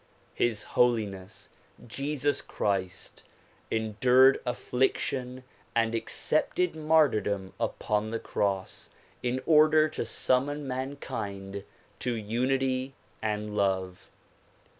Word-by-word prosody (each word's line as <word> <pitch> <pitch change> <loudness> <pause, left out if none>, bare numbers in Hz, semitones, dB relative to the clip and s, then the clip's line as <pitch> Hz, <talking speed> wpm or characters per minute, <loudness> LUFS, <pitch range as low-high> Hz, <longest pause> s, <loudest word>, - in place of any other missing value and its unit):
His 115 -3 0
Holiness 105 -6 0 0.4
Jesus 140 +3 -1
Christ 95 -3 -3 0.5
en 110 -2 -2
dured 130 +2 +6
affliction 125 +1 -1 0.3
and 115 -1 +2
accepted 160 +8 0
martyrdom 140 -12 +2
upon 105 +1 -1
the 115 - -2
cross 100 -4 -2 0.3
in 125 +1 -1
order 155 0 +6
to 150 - -3
summon 135 +5 0
mankind 100 -7 -5 0.4
to 125 -1 -1
unity 130 +4 -1 0.3
and 105 -1 -2
love. 95 -2 -1
120 Hz, 90 wpm, -28 LUFS, 105-135 Hz, 0.5 s, dured